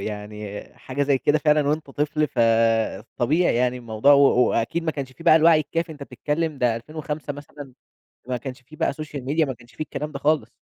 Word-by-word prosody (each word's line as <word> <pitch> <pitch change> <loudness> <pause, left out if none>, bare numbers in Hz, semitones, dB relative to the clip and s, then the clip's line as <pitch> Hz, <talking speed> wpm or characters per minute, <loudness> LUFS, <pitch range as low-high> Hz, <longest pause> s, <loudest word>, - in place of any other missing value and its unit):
يعني 105 0 -6 0.2
حاجة 135 +2 -3
زي 140 -1 +2
كده 145 +3 +2
فعلًا 150 -1 +2
وأنت 150 -1 -2
طفل 150 +2 0
فطبيعي 115 +6 +1
يعني 125 0 +1
الموضوع 120 +3 +2
و 140 - +7 0.3
وأكيد 115 +9 -1
ما 160 - 0
كانش 135 -4 -6
في 165 - -14
بقى 155 - +7
الوعي 160 0 +5
الكافي 165 +1 -3
أنت 145 - -11
بتتكلم 150 +1 -3
ده 120 -3 +2
2005 150 +3 -5
مثلًا 145 -1 -11 0.6
ما 125 - -1
كانش 130 +2 -7
في 155 +5 -15
بقى - - 0
social 150 0 -7
media 150 +5 0
ما 130 - -4
كانش 120 0 -20
في - - -19
الكلام 150 0 -5
ده 140 - -5
خالص. 145 -5 +1
140 Hz, 200 wpm, -23 LUFS, 120-155 Hz, 0.6 s, و